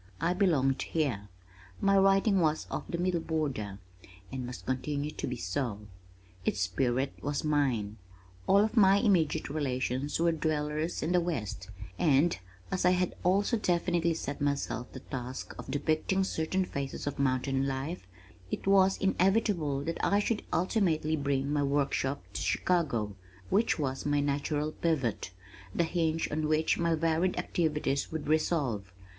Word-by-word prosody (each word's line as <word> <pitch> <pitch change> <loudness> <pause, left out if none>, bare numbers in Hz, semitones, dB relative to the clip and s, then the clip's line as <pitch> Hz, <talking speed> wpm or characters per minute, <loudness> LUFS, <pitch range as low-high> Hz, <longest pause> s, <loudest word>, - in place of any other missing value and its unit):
I 170 +2 +1
belonged 145 -8 +2
here. 120 -11 -1 0.5
My 195 0 +3
writing 195 +1 +4
was 155 -2 +1
of - - -3
the 170 - -2
Middle 175 0 +1
Border, 140 -12 -2 0.5
and 130 -2 -4
must 125 - -8
continue 145 +3 -2
to - - -4
be 125 - -2
so. 105 +2 -3 0.6
Its 95 - 0
spirit 125 +8 0
was 145 0 -2
mine. 130 -9 0 0.5
All 195 - +5
of 220 - -1
my 195 -3 +6
immediate 185 -9 +2
relations 135 -1 -1
were 170 0 +3
dwellers 155 0 -1
in 160 - 0
the 180 -1 +4
west, 115 - -4 0.3
and 155 +2 +4 0.4
as 185 - 0
I 180 - +6
had 180 0 0
also 200 +6 +2
definitely 170 -3 +1
set 140 -3 -5
myself 140 -3 -1
the - - -9
task 130 -1 -6
of - - -8
depicting 155 +7 +1
certain 185 +1 -1
phases 140 -5 -4
of 145 -1 -3
mountain 135 0 +1
life, 135 - -4 0.4
it - - -4
was 195 -1 +5
inevitable 190 -7 +1
that 165 +2 -3
I 200 - +3
should 210 +1 0
ultimately 170 -5 +1
bring 140 -1 0
my 145 - +2
workshop 140 -1 0
to - - -3
Chicago 130 - 0 0.4
which 215 +4 +3
was 135 -2 -2
my 145 0 +2
natural 145 +2 0
pivot, 140 - -1 0.5
the - - +3
hinge 165 -1 0
on 155 +1 0
which 155 +1 +2
my 170 -1 +2
varied 165 +3 +1
activities 150 -4 0
would 160 -2 -4
revolve. 145 - 0
150 Hz, 150 wpm, -30 LUFS, 135-175 Hz, 0.6 s, my